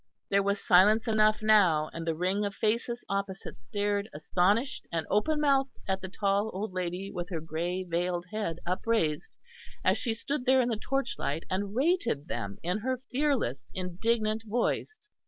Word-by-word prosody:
There 200 0 +4
was 200 +1 0
silence 210 +6 +5
enough 215 -1 +3
now, 185 -8 +4
and 165 0 -5
the 165 - +1
ring 185 +5 0
of 200 -1 -3
faces 235 +2 -1
opposite 195 - -4
stared 205 - -1
astonished 195 - +1
and 165 -1 -1
open 300 +9 +2
mouthed 275 -2 +2
at 190 0 0
the 190 - -6
tall 200 +2 +1
old 195 0 -3
lady 185 +2 -3
with 175 -1 -5
her 170 -4 -2
grey 170 +4 -3
veiled 175 0 -1
head 210 -7 -2
upraised, 180 -4 0 0.5
as - - +3
she 230 -3 -1
stood 255 +3 -3
there 260 0 +6
in 245 -1 +2
the 230 - 0
torchlight 245 - -2
and 200 +2 -2
rated 270 - +1
them 100 - -4
in 180 +5 0
her 255 +3 -2
fearless 250 - 0
indignant 215 +4 0
voice. 245 - -1
200 Hz, 165 wpm, -29 LUFS, 175-230 Hz, 0.5 s, there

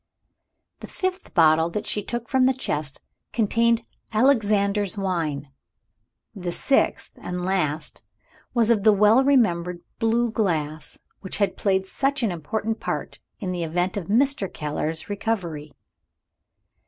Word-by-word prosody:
The - - -9
fifth 375 0 -4
bottle 160 -1 +5
that 205 +5 -4
she 210 - 0
took 240 +3 -5
from 260 -1 +3
the 260 - +2
chest 150 - -2 0.3
contained 230 +1 +2 0.3
"Alexander's 210 -4 +2
Wine." 160 -8 -2 0.8
The 180 -4 -4
sixth, 270 +9 +1
and 180 0 -4
last, 160 -5 -1 0.5
was 235 -2 +3
of 220 -3 +3
the 215 +1 +6
well 210 +5 +5
remembered 180 -11 +2 0.2
blue 230 +1 +2
glass, 155 -8 -2 0.2
which 190 - -4
had 200 -1 +1
played 190 -1 +1
such 275 +6 -1
an 220 - +1
important 215 +7 -3
part - - -4 0.2
in 190 -4 -4
the 175 -2 -2
event 175 +3 -1
of 190 -5 -4
Mr. 245 -2 +1
Keller's 155 +1 -3
recovery. 185 -8 -3
200 Hz, 130 wpm, -24 LUFS, 170-230 Hz, 0.8 s, the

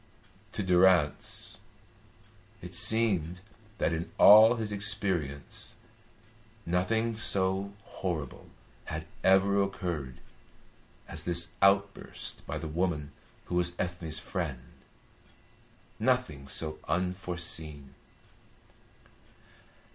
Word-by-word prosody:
To 105 - -2
Durrance 90 -5 +2 1.0
it - - -10
seemed 95 -7 +1 0.4
that 85 - +1
in 80 +1 -4
all 110 +3 +9
his 110 -3 -4
experience 95 -9 -2 0.9
nothing 110 +7 0
so 95 -2 +1
horrible 85 -6 -5 0.4
had - - -5 0.2
ever 100 +1 +4
occurred 85 -9 -3 0.9
as - - -3
this 85 -1 0
outburst 100 0 +1
by - - -3
the 80 - -5
woman 80 -2 -1 0.3
who - - -7
was 90 0 +1
Ethne's 85 -3 -3
friend, 75 -7 -5 1.3
nothing 110 - 0
so 75 +2 -3
unforeseen. 85 -6 -2
90 Hz, 85 wpm, -30 LUFS, 80-100 Hz, 1.3 s, all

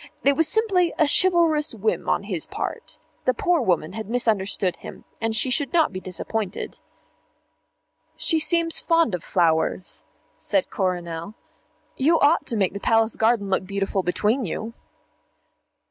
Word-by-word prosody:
It 280 0 +4
was 325 +1 +3
simply 375 -4 +2
a 315 - +4
chivalrous 325 -5 +3
whim 215 0 -1
on - - +1
his 185 -6 -4
part. - - -5 0.3
The 255 - +2
poor 350 +5 +1
woman 180 -6 0
had 220 -1 -6
misunderstood 205 -6 0
him, - - -11 0.2
and 225 0 -1
she 255 +4 +2
should 265 +2 0
not 325 -10 +3
be 185 - -4
disappointed. 190 +3 -4 1.4
"She 325 -3 +3
seems 335 +1 +2
fond 330 - +2
of 175 -2 -3
flowers," 170 0 0 0.4
said 290 - 0
Coronel. 175 -1 -3 0.6
"You 320 +5 +3
ought 295 +4 +3
to 230 - -2
make 190 -3 +1
the 200 - -5
Palace 225 +1 +2
garden 220 -3 +1
look 190 0 0
beautiful 195 0 -1
between 210 +8 0
you." 220 +4 -5
225 Hz, 145 wpm, -23 LUFS, 190-305 Hz, 1.4 s, It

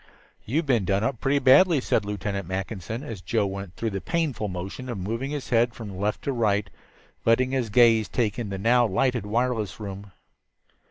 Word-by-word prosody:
"You've 150 +9 0
been 120 -7 +2
done 100 +2 +1
up 115 0 -1
pretty 135 +1 +2
badly," 145 +5 +6
said 110 -4 0
Lieutenant 100 -2 -3
Mackinson, 95 +5 -4
as 110 -10 -7
Joe 110 +2 0
went 100 -2 -6
through 115 +3 -2
the 95 -1 -4
painful 155 -11 -1
motion 95 +7 -6
of 120 - -3
moving 115 +8 -3
his 145 -3 -5
head 115 0 +3
from 105 -4 -8
left 105 +3 -2
to 140 - -1
right, 105 -5 +1 0.6
letting 125 +3 +3
his 130 -4 -1
gaze 115 0 +5
take 110 -2 -1
in 115 -4 -3
the 95 - -4
now 120 +4 +3
lighted 120 +1 0
wireless 115 -1 -1
room. 100 -1 -7
110 Hz, 185 wpm, -25 LUFS, 100-125 Hz, 0.6 s, badly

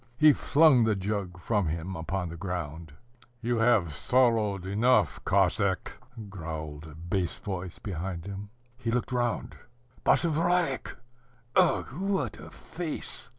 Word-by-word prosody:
He 155 -1 +7
flung 140 -3 +5
the 110 -1 +2
jug 95 -2 -3
from 105 -1 0
him 85 +4 -3
upon 90 +2 -3
the 85 - -7
ground. 85 -4 -5 0.5
"You 120 +1 0
have 110 -9 +3
sorrowed 110 - +2
enough, 110 +7 +2
Cossack," - - +1 0.3
growled 80 -5 -6
a 75 - -11
bass 85 +2 -2
voice 95 -3 -5
behind 90 -3 -5
him. 100 +1 -6 0.3
He 120 - -3
looked 125 +2 -1
round 120 -2 -1 0.5
Basavriuk! 170 -2 +1 0.6
Ugh, - - +4
what 195 0 -1
a - - -10
face! 165 -2 -4
100 Hz, 125 wpm, -28 LUFS, 85-125 Hz, 0.6 s, He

